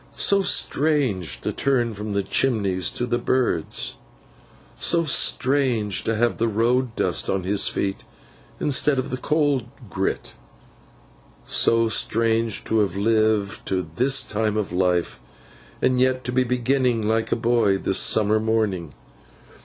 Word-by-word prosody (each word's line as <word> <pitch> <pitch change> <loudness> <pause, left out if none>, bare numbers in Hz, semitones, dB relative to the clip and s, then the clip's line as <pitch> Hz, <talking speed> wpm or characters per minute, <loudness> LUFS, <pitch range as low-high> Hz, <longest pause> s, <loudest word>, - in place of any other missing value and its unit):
So 200 0 +3
strange 140 - 0
to - - -3
turn 120 -4 0
from 105 +1 -7
the 100 -1 -1
chimneys 100 -5 0
to 120 - -3
the 120 0 -1
birds. 120 -10 -1 0.8
So 170 -1 +2
strange, 130 -7 +1
to 115 - 0
have 120 +2 0
the 115 - +1
road 115 +2 0
dust - - 0
on 95 -1 -1
his 100 +2 +2
feet 95 -1 -3 0.6
instead 145 0 +2
of 130 - -3
the 130 - -2
coal 145 -1 +1 0.3
grit. - - -3 1.1
So 115 0 +2
strange 115 0 0
to 110 - 0
have 100 -2 0
lived 110 -1 0
to 90 -3 -2
his 135 +2 +3
time 110 0 -2
of 105 -4 -2
life, 90 -5 0 0.6
and 125 -1 +2
yet 130 0 +1
to 125 - -4
be 130 +1 +2
beginning 125 -2 0
like 110 0 0
a - - +3
boy 115 -4 +1
this 95 - 0
summer 110 0 +3
morning! 105 -8 -1
115 Hz, 140 wpm, -22 LUFS, 100-130 Hz, 1.1 s, So